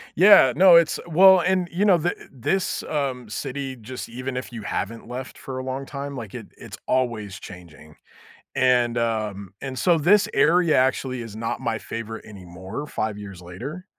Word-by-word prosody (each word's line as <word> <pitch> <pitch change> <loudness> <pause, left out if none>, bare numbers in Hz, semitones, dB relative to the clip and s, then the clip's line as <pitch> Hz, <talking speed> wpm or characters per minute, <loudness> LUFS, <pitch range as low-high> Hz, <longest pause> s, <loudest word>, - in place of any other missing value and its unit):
Yeah, 180 -7 +7
no, 180 +1 +7
it's 170 -2 +4
well 190 +3 +7
and, 180 0 +1
you 190 +4 0
know, 190 -4 +5
thi 170 +2 0 0.2
this, 180 +9 -1
um, 130 -6 -3
city, 135 +3 -5
just 125 +3 -8
even 130 +2 -5
if 130 0 -5
you 115 -2 -7
haven't 115 +3 -4
left 125 +2 -7
for 130 -1 -7
a 130 - -4
long 130 +1 -4
time, 140 0 -6
like, 115 -6 -8
it - - -8
it's - - -10
always 115 -6 -1
changing. 85 -5 -13 0.6
And, 125 -2 +2
um, 105 -4 -2
and 135 -1 -6
so 175 +2 +3
this 195 +7 +4
area 170 -2 +3
actually 130 -1 0
is 115 -3 -9
not 115 +1 -4
my 110 - -1
favorite 115 0 -7
anymore 95 +5 -8
5 110 -4 -3
years 100 -3 -9
later 125 - -8
130 Hz, 175 wpm, -23 LUFS, 110-150 Hz, 0.6 s, Yeah